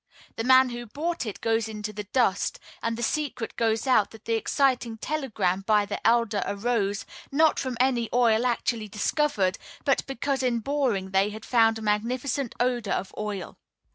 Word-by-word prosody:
The 225 - -2
man 260 +1 +6
who 240 0 -6
bought 315 +2 -3
it 210 - -6
goes 225 -1 +1
into 210 -1 -5
the 210 0 -6
dust; 205 -3 +1 0.2
and 230 0 -2
the 240 - -3
secret 275 -4 -2
gets 225 -1 +1
out 250 -6 +4
that 225 0 -15
the 230 - 0
exciting 245 0 +1
telegram 220 -10 -1
sent 195 - -13
by 210 -2 +4
the 200 +1 -2
elder 230 -3 +2
arose, 200 -1 -1 0.3
not 310 +2 +3
from 255 -3 -3
any 245 -3 +2
oil 240 -1 +3
actually 235 -2 -1
discovered, 210 -1 0 0.3
but 275 - +2
because 270 +1 -1
in 250 -2 +1
boring 230 -7 -1
they 195 +1 +3
had 215 +1 -9
found 225 -2 +4
a 220 - -7
magnificent 245 +5 -1
odor 245 -4 0
of 190 - -3
oil. 210 -4 -5
230 Hz, 175 wpm, -26 LUFS, 210-255 Hz, 0.3 s, man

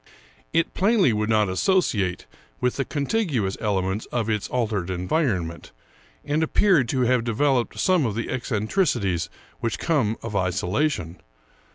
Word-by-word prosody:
It 165 0 +1
plainly 195 - +3
would 105 +1 -1
not 110 -2 +3
associate 95 - +1 0.3
with 125 0 0
the 135 - 0
contiguous 140 - -1
elements 95 -1 -1
of 115 -2 -1
its 105 -2 -1
altered 105 -7 -1
environment, 90 - -1 0.5
and 150 +2 0
ap 160 - -2
peared 170 - +4
to 130 - 0
have 125 -1 +2
developed 120 +2 +1
some 180 -8 +3
of 105 - -3
the 115 - -3
eccentricities 110 - 0 0.3
which 115 - -2
come 130 -10 +1
of 115 -2 -5
isolation. 95 - -1
115 Hz, 140 wpm, -24 LUFS, 100-145 Hz, 0.5 s, peared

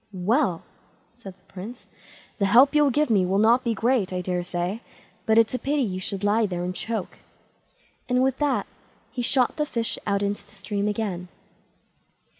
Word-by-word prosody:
"Well!" 190 - +1 0.5
said 200 -6 -11
the - - -33
Prince, 210 +7 -9 0.5
"the 200 - +2
help 255 +8 +6
you'll 295 -1 +4
give 295 0 +1
me 200 -4 +4
will 185 +2 +1
not 230 +4 +4
be 235 -3 0
great, 230 -5 +1
I 180 0 -2
daresay, 180 +2 -2 0.5
but 220 0 +4
it's 230 +1 +4
a 255 - -1
pity 285 0 0
you 185 -5 -3
should 195 +1 -4
lie 210 +2 +3
there 175 -2 -3
and 180 +1 -3
choke"; 220 0 -4 0.9
and 250 +1 +3
with 265 0 0
that 290 -3 +1 0.5
he 250 - -3
shot 250 +3 +2
the 300 - +1
fish 230 -3 -2
out 200 0 +1
into 200 0 -2
the 205 - -22
stream 200 +1 -3
again. 200 -4 -3
215 Hz, 180 wpm, -25 LUFS, 190-250 Hz, 0.9 s, help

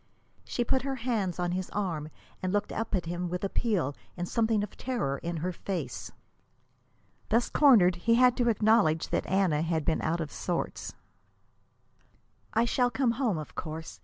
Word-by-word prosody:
She 240 - -1
put 260 +2 +1
her 270 0 -2
hands 225 -8 -1
on 175 -1 -1
his 185 0 -2
arm 165 -7 -2 0.3
and 185 - -1
looked 205 +1 0
up 225 -1 -2
at 180 - -1
him 175 +1 -3
with 180 +2 -4
appeal 195 - 0 0.2
and 175 0 -3
something 220 -1 +1
of 210 - -7
terror 185 - -2
in 170 0 -4
her 175 +4 -2
face. 170 -7 -5 1.2
Thus 230 +2 +2
cornered, 205 - +6
he 230 +6 +3
had 250 0 +5
to 240 -2 +3
acknowledge 210 -7 +3
that - - -1
Anna 185 -6 +2
had 160 -2 -1
been 160 - +1
out 165 +2 0
of 155 -3 -4
sorts. 175 -2 -3 1.6
"I 225 +1 +3
shall 245 +1 +2
come 250 -1 +1
home, 235 - 0
of 155 - -7
course. 160 -1 -6
190 Hz, 170 wpm, -29 LUFS, 170-230 Hz, 1.6 s, cornered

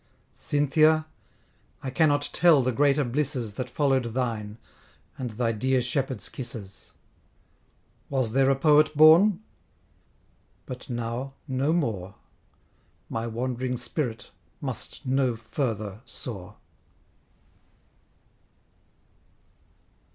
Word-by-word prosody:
Cynthia! 155 +2 +2 0.8
I 130 - -3
cannot 145 0 +2
tell 165 -6 +5
the 130 - +1
greater 145 +3 +3
blisses, 125 -3 -2
That 125 - -5
follow'd 135 -4 +1
thine, 110 -4 -2 0.6
and 125 -2 -4
thy 115 +1 -1
dear 130 +4 +1
shepherd's 125 -1 -2
kisses: 110 -6 -8 1.2
Was 130 -5 0
there 135 +2 +3
a 135 - +4
Poet 150 +1 +4
born? 170 +6 +7 1.2
but 125 0 -8
now 120 +3 -4
no 135 +3 0
more, 105 - -1 0.9
My 115 +1 -3
wand'ring 125 +2 -2
spirit 120 -1 -4 0.3
must - - -5
no 130 -2 +1
further 110 -3 -4
soar. 105 -4 -8
130 Hz, 90 wpm, -26 LUFS, 115-145 Hz, 1.2 s, born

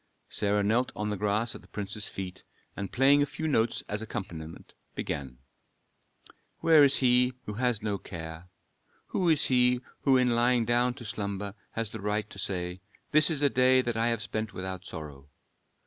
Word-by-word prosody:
Sarah 105 0 0
knelt 115 +5 +1
on 105 0 -2
the - - -1
grass 105 +3 0
at - - -10
the - - -19
prince's 105 0 -4
feet, 95 -1 -7 0.3
and 100 -2 -5
playing 140 +3 +4
a - - +3
few 160 +2 -4
notes 120 -6 +1
as 105 +1 -3
accompaniment, 90 -8 -7 0.2
began, 65 -3 -4 1.2
"Where 160 -3 +6
is 140 -1 +5
he 125 0 +3
who 105 - -5
has 120 -1 0
no 105 -2 -1
care? 80 -1 -8 0.6
Who 180 -2 +1
is 155 -3 +4
he 125 -1 +3 0.2
who 135 -2 +4
in 125 -1 +3
lying 120 0 +3
down 120 +1 +2
to 120 - -10
slumber 100 -2 -4 0.2
has 115 -2 -3
the 110 - -7
right 105 0 -1
to 100 - -9
say: 90 -1 -3 0.3
This 155 +1 +8
is 150 -3 0
a 145 - +5
day 130 0 +4
that 120 -2 -2
I 115 +1 +1
have 115 -2 0
spent 110 -1 -4
without 95 0 -5
sorrow? 75 -4 -9
110 Hz, 180 wpm, -28 LUFS, 100-125 Hz, 1.2 s, This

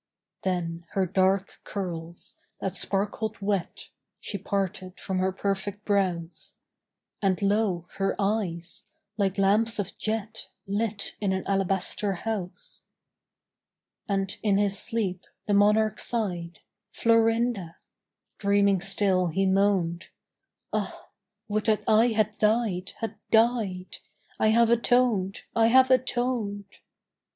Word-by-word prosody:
Then 170 -3 -2
her 195 -1 +2
dark 190 +2 +1
curls, 170 -4 -6 0.2
that 190 - -3
sparkled 210 +2 -1
wet, 200 -3 -2 0.3
She 200 - -5
parted 190 -1 -3
from 190 -2 -2
her 190 +1 +1
perfect 200 +1 -3
brows, 180 -5 -1 0.7
And, 190 -3 +1
lo, 200 -4 +1
her 195 0 0
eyes, 195 -5 -2 0.3
like 195 -2 0
lamps 210 +4 +3
of 195 -2 -3
jet 220 0 -3 0.2
Lit 205 +1 -2
in 195 -2 +1
an 190 - -3
alabaster 195 +1 0
house. 190 -1 -5 1.3
And 195 -1 -1
in 205 -2 +2
his 200 -1 +2
sleep 200 -6 -2 0.2
the 205 - 0
monarch 210 +2 +3
sighed, 175 -8 -2 0.3
"Florinda!" 225 -5 +2 0.6
Dreaming 200 -2 +3
still 195 -1 +2
he 190 +4 0
moaned, 190 -3 +1 0.6
"Ah, - - -4 0.4
would 215 0 -1
that 215 -1 +2
I 220 +2 +5
had 215 -2 0
died, 210 -4 +1
had 225 -1 -4
died! 220 -6 +1 0.4
I - - +3
have 230 +1 +4
atoned! 235 -5 +2
I 225 -1 +5
have 260 +2 +5
atoned!"... 240 -5 0
200 Hz, 115 wpm, -27 LUFS, 190-220 Hz, 1.3 s, I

